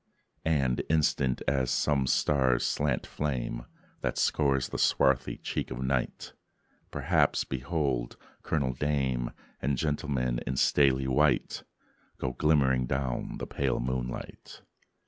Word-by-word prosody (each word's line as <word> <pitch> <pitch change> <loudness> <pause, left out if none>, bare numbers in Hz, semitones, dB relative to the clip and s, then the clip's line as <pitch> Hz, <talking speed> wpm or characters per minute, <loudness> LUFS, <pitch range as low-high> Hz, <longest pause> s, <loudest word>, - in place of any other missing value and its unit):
And, 70 -6 +2
instant 75 -4 +1
as 65 -2 +1
some 65 +1 +1
star's 65 -3 +2
slant - - 0
flame, 60 -4 -3 0.3
That - - -2
scores 70 -3 +2
the - - -4
swarthy 65 -1 +2
cheek - - -3
of 65 0 -4
night, 65 -1 -2 0.6
Perhaps 75 +1 +2
behold 65 -3 -2 0.2
Colonial 70 -5 0
dame 65 -3 0 0.3
And 70 0 0
gentleman 70 -4 -1
in 65 - -1
stately 65 -1 +3
white 70 +1 +2 0.6
Go 65 - -2
glimmering 65 -4 +2
down 65 -2 -2
the - - -4
pale 70 -2 -1
moonlight. 60 0 -5
65 Hz, 115 wpm, -29 LUFS, 65-70 Hz, 0.6 s, stately